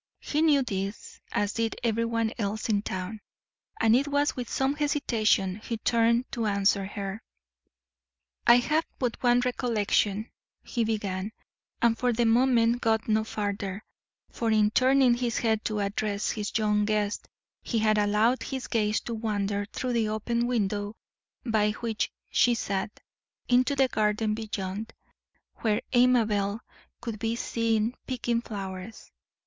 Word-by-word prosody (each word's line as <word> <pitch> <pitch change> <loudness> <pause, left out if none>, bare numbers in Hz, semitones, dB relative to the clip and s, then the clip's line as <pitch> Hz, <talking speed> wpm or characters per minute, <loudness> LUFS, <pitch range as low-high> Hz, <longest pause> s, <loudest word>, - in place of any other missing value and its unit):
He 300 - -1
knew 295 -4 +4
this, 195 -2 -5
as 205 0 0
did 230 -1 -1
everyone 230 -1 0
else 210 +2 -2
in 205 -2 +2
town, 190 +2 -5 0.6
and 225 0 +5
it 275 +3 +2
was 285 0 +1
with 245 -2 -5
some 265 +1 +1
hesitation 225 -10 +1
he 230 +2 -5
turned 235 +2 +2
to 230 -2 -1
answer 200 -1 +2
her. 200 +1 -5 1.3
"I 235 - +9
have 305 +6 +2
but 245 -3 -2
one 245 0 +4
recollection," 220 -4 0 0.3
he 235 - -1
began, 205 -2 -2 0.5
and 235 -1 +4
for 245 +1 +1
the 235 +1 +1
moment 240 0 +3
got 220 -2 +1
no 220 0 +2
farther, 205 -2 -4 0.5
for 230 - -2
in 215 -1 +3
turning 260 +1 +4
his 240 -1 -1
head 220 -2 +1
to 215 -1 -1
address 200 +1 -1
his 210 -1 -2
young 210 -1 +2
guest 210 -1 -1 0.3
he 235 - -2
had 215 -1 +3
allowed 210 +5 +2
his 265 -2 -4
gaze 215 -2 0
to 235 - -5
wander 205 -2 -2
through 255 -1 -2
the 225 -2 +1
open 235 +2 -1
window 205 -3 -1 0.5
by 215 -3 +2
which 225 -1 -2 0.2
she 240 -1 +4
sat, 200 -2 -3 0.5
into 255 +3 +3
the 265 -1 +4
garden 215 -1 0
beyond, 215 -1 -4 0.6
where 215 -1 +1
Amabel 225 -4 +3 0.4
could 230 -3 -5
be 225 +2 -1
seen 230 -1 0
picking 240 -2 -1
flowers. 195 -1 -7
220 Hz, 145 wpm, -27 LUFS, 210-240 Hz, 1.3 s, I